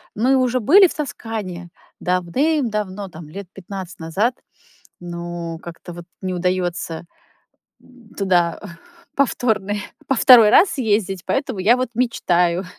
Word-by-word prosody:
мы 250 +5 +2
уже 255 -1 +1
были 370 - +6
в - - -7
Тоскане 215 - -5 0.3
давным-давно, 205 - -1
там, 160 -2 -11
лет 195 +4 -8
15 190 -1 -8
назад. 195 +10 -1 0.6
Но 170 -1 -6
как-то 170 +1 -10
вот 175 0 -10 0.2
не 185 -1 -3
удаётся 175 -2 -2 0.8
м, 245 -3 -20
туда 175 -4 +1 0.6
повторный 215 -7 0 0.3
во 270 - +1
второй 235 -4 +8
раз 360 - +6
съездить, 205 - -1
поэтому 265 -6 -2
я 220 +6 +4
вот 255 -1 -2
мечтаю 180 -7 +1
195 Hz, 120 wpm, -20 LUFS, 175-245 Hz, 0.8 s, второй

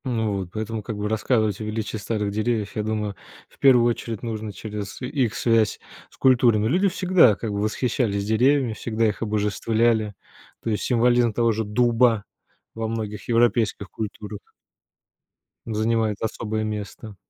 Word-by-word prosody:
Ну 110 -5 -1
вот, 95 -2 -5
поэтому 110 +1 -4
как 105 0 -6
бы 105 0 -2
рассказывать 110 -1 0
о - - -3
величии 110 +1 -3
старых 105 -1 -2
деревьев, 110 0 -1
я 110 - 0
думаю, 105 -1 -2 0.3
в - - -25
первую 125 -4 +6
очередь, 115 -2 -3
нужно 110 -2 -4
через 105 0 -7
и 125 - -4
их 125 -5 0
связь 115 -3 +2 0.3
с - - -22
культурами. 120 -5 +4
Люди 185 - +3
всегда 180 - +4
как 110 +1 -4
бы 100 0 -2
восхищались 110 -2 0
деревьями, 125 +3 +2
всегда 110 0 -1
их 105 - -3
обожествляли. 110 0 +1 0.5
То 115 - -1
есть 105 - -1
символизм 120 -1 +3
того 115 +1 +2
же 110 0 -2
дуба 115 0 +3 0.5
во 115 0 -3
многих 110 -2 -5
европейских 115 -4 +2
культурах 105 -1 -6 1.3
занимает 110 -1 0
особое 110 0 -2
место. 105 0 -6
110 Hz, 155 wpm, -24 LUFS, 105-120 Hz, 1.3 s, первую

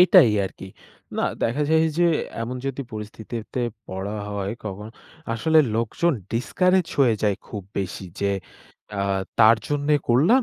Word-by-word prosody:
এটাই 180 -9 +8
আরকি। 95 - -7 0.5
না, - - 0 0.2
দেখা 120 +6 +1
যায় 160 0 +5 0.2
যে, 175 - +5 0.4
এমন 125 +2 -4
যদি 135 0 -3
পরিস্থিতিতে 110 +3 -5 0.3
পড়া 95 +3 -4
হয় 100 0 -2
কখনো, 105 +2 -6 0.4
আসলে 160 +8 +3 0.2
লোকজন 115 +9 +1 0.2
ডিসকারেজ 180 +9 +2
হয়ে 125 -5 +5
যায় 105 -2 +2
খুব 105 - -6 0.2
বেশি। 95 0 -3 0.2
যে, 100 - +1 0.7
অ্যা 100 - -1 0.4
তার 110 0 +8
জন্যে 145 0 +2
করলাম। 165 - +5
115 Hz, 140 wpm, -24 LUFS, 105-150 Hz, 0.7 s, এটাই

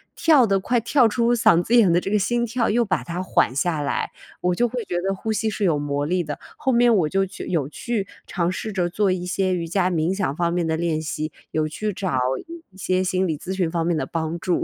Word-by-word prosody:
跳 295 -7 +5
得 195 -1 +3
快 240 +4 +1
跳 240 +3 +3
出 235 +2 +2
嗓 175 -7 +4
子 230 +7 +1
眼 215 -7 +6
的 170 - +4
这 190 - -4
个 210 - +2
心 235 +4 +1
跳， 235 0 0
又 235 +2 +2
把 195 - -1
它 175 +2 -4
缓 185 -8 +1
下 155 +3 0
来？ 140 -1 -2 0.3
我 180 0 0
就 240 +5 +1
会 240 -1 -4
觉 175 - -4
得 195 +1 0
呼 220 +3 -3
吸 220 +1 0
是 210 -1 -2
有 165 -5 +3
魔 145 0 -2
力 175 +3 0
的。 150 -2 -6 0.2
后 285 -3 0
面 240 -1 +4
我 165 -6 +2
就 195 +2 +1
去 190 - -8
有 155 -6 0
去 205 - -3 0.2
尝 175 -2 -1
试 185 +4 -4
着 185 -3 0
做 195 +2 +1
一 180 -1 -2
些 185 0 0
瑜 170 -2 -2
伽 185 +1 +1
冥 165 +1 +1
想 190 -8 -1
方 170 -1 +1
面 175 -1 0
的 160 0 0
练 160 -2 -1
习， 155 0 -4 0.2
有 155 -1 0
去 210 +7 -3
找 185 -7 -2 0.5
一 190 - -19
些 185 -1 0
心 185 0 0
理 160 -3 -2
咨 190 +5 -5
询 180 -3 0
方 165 -1 -1
面 175 - +1
的 - - -1
帮 165 0 -3
助。 175 0 0
185 Hz, 275 characters per minute, -23 LUFS, 170-215 Hz, 0.5 s, 眼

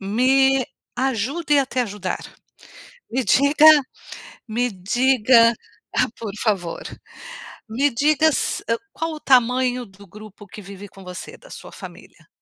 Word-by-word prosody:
me 260 +6 +2 0.3
ajude 270 +5 0
a 270 - -1
te 255 - -2
ajudar, 205 -5 -4 0.9
me 255 - -1
diga 285 +3 +4 0.8
me 240 +3 -1
diga, 230 +4 +3 0.7
por 220 -3 -6
favor, 190 -7 -2 0.9
me 270 +6 +1
diga 305 +5 +2
se - - -1 0.3
qual 325 0 -4
o 305 - -10
tamanho 250 -1 +2
do 200 0 -17
grupo 210 +1 -14
que 210 - -11
vive 200 +1 -11
com 195 0 -15
você, 180 0 -9
da - - -18
sua - - -10
família? - - -13
245 Hz, 125 wpm, -21 LUFS, 205-270 Hz, 0.9 s, diga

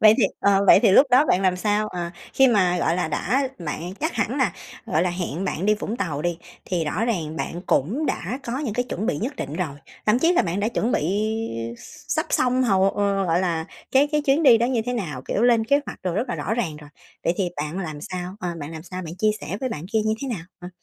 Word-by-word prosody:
Vậy 215 0 +8
thì 220 - +5 0.2
ờ, 200 0 +4
vậy 195 - +8
thì - - +5
lúc 275 +8 +7
đó 255 +4 +6
bạn 190 - +2
làm 185 -1 +2
sao? 210 +2 0
Ờ, 175 -3 -4 0.2
khi 270 0 +6
mà, 185 -6 +3
gọi 170 0 +1
là, 180 - 0
đã 260 - 0
bạn 170 +3 -5
chắc 315 +3 0
hẳn 225 +4 -1
là, 245 -10 +2 0.3
gọi 160 - +1
là, 180 - +1
hẹn 175 0 -3
bạn 185 0 -2
đi 210 - +5
Vũng 220 +2 -4
Tàu 155 -7 -2
đi, 175 -1 -1 0.3
thì 175 -3 -1
rõ 210 +9 -1
ràng 165 -9 -2
bạn 175 - -4
cũng 235 - +1
đã 220 +10 -2
có 240 +2 -3
những 260 -8 -3
cái 245 +1 0
chuẩn 215 +1 -3
bị 255 - 0
nhất 260 +5 -3
định 140 - -5
rồi. 155 -6 -3 0.3
Thậm 215 +3 +4
chí 330 +5 +4
là - - +3
bạn 180 +3 -2
đã 210 - +1
chuẩn 235 +1 -1
bị 185 +7 +1 0.6
x - - -15 0.3
sắp 315 +3 0
xong 255 +1 +2
hầu 195 -4 +3
ờ, 200 -1 0
gọi 170 +1 +2
là, 165 -3 -1 0.3
cái 275 +2 +5
cái 300 - +2
chuyến 285 +3 +2
đi 250 -6 +7
đó 235 - +2
như 245 -3 0
thế 245 - -1
nào, 160 - -4
kiểu, 210 - 0
lên 235 -2 +4
kế 280 +5 +3
hoạch - - -8
đồ 180 -2 -1
rất 225 +7 -1
là - - -1
rõ 165 +8 -2
ràng 185 -11 -2
rồi. 150 -1 -13 0.3
Vậy 170 - +2
thì 190 -3 0
bạn 150 +4 -3
làm 155 -6 -5
sao, 180 +3 -5
ờ, 180 - -2
bạn 145 +1 -6
làm 160 -1 -7
sao? 185 +1 -6
Bạn 165 0 -7
chia 215 0 +3
sẻ 195 - -4
với 260 - -1
bạn 165 -6 -5
kia 220 - +3
như 220 0 +2
thế 275 - -3
nào? 200 -10 -4 0.2
Ờ. 180 - -7
195 Hz, 270 wpm, -23 LUFS, 170-240 Hz, 0.6 s, Vậy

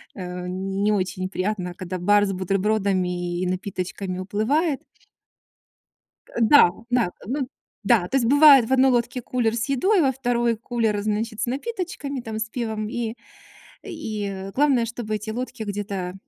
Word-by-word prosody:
э-э, 180 -1 -6
не 195 +3 -1
очень 185 -2 -1
приятно, 185 -2 -2
когда 185 0 -5
бар 205 +3 +4
с 195 - -2
бутербродами 185 -2 0
и 185 - 0
напиточками 185 0 -4
уплывает. 265 - 0 1.6
Да, 225 -5 +7 0.2
да, 245 -7 +2
ну, 265 +3 -2 0.4
да, 200 -4 +3
то 270 - +1
есть 235 - +1
бывает, 285 -3 +8
в 265 - +1
одной 265 0 +5
лодке 245 +1 0
кулер 235 -2 0
с 230 - -1
едой, 350 - +2
во 270 -2 +3
2 240 -2 0
кулер, 225 -2 -1
значит, 215 +1 -2
с - - +1
напиточками 285 - -4
там, 220 -1 -5
с 220 0 -3
пивом, 220 -3 -3
и 235 -2 -3 0.7
и 205 - -5
главное, 270 -4 +3
чтобы 230 -2 -4
эти 215 +1 -5
лодки 245 -1 -5
где-то 200 -3 -4
220 Hz, 145 wpm, -23 LUFS, 195-250 Hz, 1.6 s, бывает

